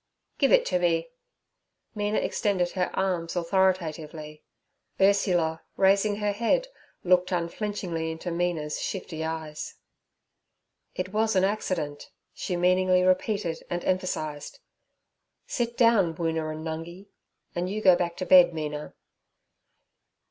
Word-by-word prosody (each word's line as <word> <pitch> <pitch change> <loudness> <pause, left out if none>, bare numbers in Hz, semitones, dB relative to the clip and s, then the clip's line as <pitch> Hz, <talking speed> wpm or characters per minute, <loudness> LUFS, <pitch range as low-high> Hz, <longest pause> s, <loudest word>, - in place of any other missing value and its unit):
'Give - - +3
it - - +5
to 180 - +1
me.' 170 +2 +1 0.8
Mina 210 0 -1
extended 185 -4 0
her 180 -2 -1
arms 180 -3 -1
authoritatively. 165 -4 -1 0.6
Ursula, 180 -5 +2 0.2
raising 200 +2 +3
her 210 0 -1
head, 235 - 0 0.3
looked 180 0 +3
unflinchingly 175 -1 -2
into 160 +2 -5
Mina's 170 -3 -2
shifty 170 -4 -4
eyes. 160 -1 -5 1.2
'It 185 +1 -4
was 220 0 +1
an 185 - +4
accident' 180 -7 -2 0.2
she 180 - -3
meaningly 185 +1 +3
repeated 185 -2 0
and 175 0 -3
emphasized. 155 -5 -2 0.9
'Sit 235 -1 -2
down, 215 -9 +4
Woona 160 -1 -1
and 155 +1 -7
Nungi, 165 +4 -6 0.5
and 175 0 -2
you 210 +2 -2
go 185 -4 +6
back 170 -1 -2
to 185 - -3
bed, 180 -2 +7
Mina.' 150 -1 -5
180 Hz, 120 wpm, -27 LUFS, 160-195 Hz, 1.2 s, bed